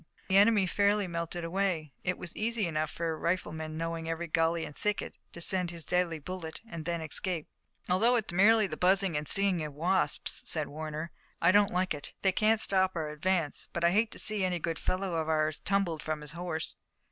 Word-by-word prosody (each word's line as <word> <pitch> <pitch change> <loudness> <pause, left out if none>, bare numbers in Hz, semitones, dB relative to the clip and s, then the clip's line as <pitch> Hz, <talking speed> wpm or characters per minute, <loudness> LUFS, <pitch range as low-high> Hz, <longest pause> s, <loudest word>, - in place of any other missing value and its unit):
The 190 - +5
enemy 205 -1 +6
fairly 200 +2 +2
melted 170 0 -4
away. 165 -4 -1
It 180 - 0
was 170 - -7
easy 225 -1 0
enough 155 -2 -1
for 165 +1 -2
a - - -2
rifleman, 160 -2 -2
knowing 165 0 -3
every 165 +1 -2
gully 165 0 +1
and 150 - -9
thicket, 210 0 -2 0.2
to - - -10
send 180 +1 0
in 170 - -7
his 165 - -7
deadly 180 -2 +1
bullet 160 +1 -6
and 165 -6 -7
then 170 -1 -1
escape. 160 +1 -1 0.4
"Although 220 +7 +4
it's 220 -7 -1
merely 215 +4 +6
the 190 - -4
buzzing 190 -1 +3
and 150 0 -2
stinging 195 -4 +3
of 150 -2 -6
wasps," 180 +5 +1
said 155 -3 -1
Warner, 155 +2 -5 0.3
"I - - +5
don't 205 +1 +5
like 180 0 +1
it. 145 -2 -8
They 190 - +5
can't 215 +3 +3
stop 190 -3 +1
our 160 -2 -2
advance, 160 0 -1
but 170 - -2
I 170 - +5
hate 215 +4 +3
to - - -8
see 215 -2 -2
any 180 -1 +1
good 165 0 -3
fellow 185 -2 -1
of 160 0 -1
ours 155 -1 +1
tumbled 190 -6 0
from 155 -1 -3
his 150 -1 -8
horse." 170 -1 -4
170 Hz, 210 wpm, -30 LUFS, 160-190 Hz, 0.4 s, enemy